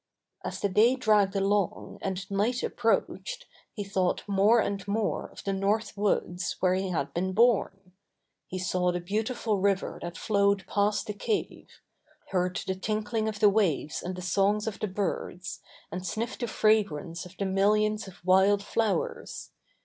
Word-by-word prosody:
As - - -4
the 200 - +1
day 215 +6 +4
dragged 210 -5 +3
along, 195 0 0
and 190 0 -4
night 220 +6 0
ap - - -1
proached, 475 - -1 0.3
he 210 - -5
thought 190 -2 0
more 205 +4 +4
and 200 -2 -2
more 210 +1 -1
of - - -12
the 195 - -1
North 205 +3 0
Woods 190 -3 0
where 185 -1 +3
he 190 0 -1
had 160 -6 -2
been 185 +2 -1
born. 195 -4 +2 0.6
He 185 - -5
saw 180 -1 +1
the 175 - -2
beautiful 215 +3 -1
river 195 0 0
that 170 -1 -6
flowed 200 -3 +2
past 205 +3 +1
the 210 - -4
cave, 415 - -3 0.6
heard 180 +1 0
the 190 - -1
tinkling 215 +3 -2
of 210 -1 -6
the 210 - +7
waves 180 -8 +1
and 180 +1 -4
the 180 - -7
songs 200 +3 +2
of 220 -3 -4
the 215 - -1
birds, 185 -2 -3 0.3
and 180 - -4
sniffed 220 +7 -3
the 240 - -2
fragrance 180 -7 +1
of 180 +1 -18
the 195 - -1
millions 210 +2 +2
of 180 -2 -14
wild 190 +2 +4
flowers. 230 - -2
200 Hz, 165 wpm, -28 LUFS, 185-215 Hz, 0.6 s, the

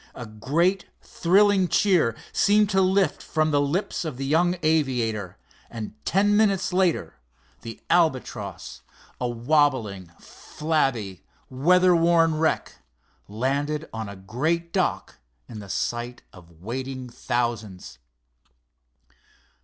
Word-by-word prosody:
A 120 - -7
great, 165 - 0
thrilling 195 +1 +2
cheer 175 - +2 0.2
seemed 210 0 +3
to 190 -1 +3
lift 190 +1 +1
from 155 -1 0
the 145 -1 +2
lips 165 +7 -2
of 155 -6 -5
the 135 - -4
young 175 +5 +2
aviator, 120 - 0 0.3
and 110 -2 -7
ten 205 +3 +2
minutes 200 -4 +2
later 170 - 0 0.4
the 115 -1 -9
Albatross, 160 -7 -1 0.4
a 125 - -1
wobbling, 120 - 0
flabby, 135 - -2 0.3
weather 180 +7 +4
worn 165 -2 +3
wreck, 160 0 -1 0.5
landed 140 +8 -2
on 110 -2 -5
a 100 - -8
great 155 - -2
dock - - -1 0.3
in 110 - -9
the 100 -1 -10
sight 120 +5 -3
of 85 -2 -17
waiting 130 +3 -5
thousands. 115 - -4
145 Hz, 115 wpm, -24 LUFS, 115-170 Hz, 0.5 s, weather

